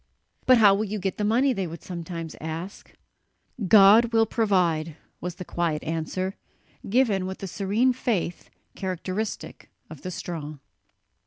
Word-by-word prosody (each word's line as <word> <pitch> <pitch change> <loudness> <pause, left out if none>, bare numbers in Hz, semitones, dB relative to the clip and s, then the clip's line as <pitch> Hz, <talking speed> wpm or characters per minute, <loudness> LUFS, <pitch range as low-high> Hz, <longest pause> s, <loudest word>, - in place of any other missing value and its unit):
"But 255 -1 +7
how 205 -3 +7
will 200 +2 0
you 210 +1 -3
get 195 -1 -3
the - - 0
money?" 250 +6 +3
they 195 -5 -2
would 165 +1 -9
sometimes 170 -2 -6
ask. 165 +5 -6 0.8
"God 210 +3 +8
will 225 0 +5
provide," 180 -8 +1 0.2
was 180 0 -5
the 180 0 -8
quiet 165 -3 -1
answer, 165 +4 -2 0.6
given 205 -5 +2
with 190 - -5
the - - -6
serene 200 +8 +1
faith 205 -9 -2 0.3
characteristic 190 +2 -4 0.2
of 155 - -10
the 185 - -5
strong. 155 -5 -6
190 Hz, 145 wpm, -25 LUFS, 170-215 Hz, 0.8 s, God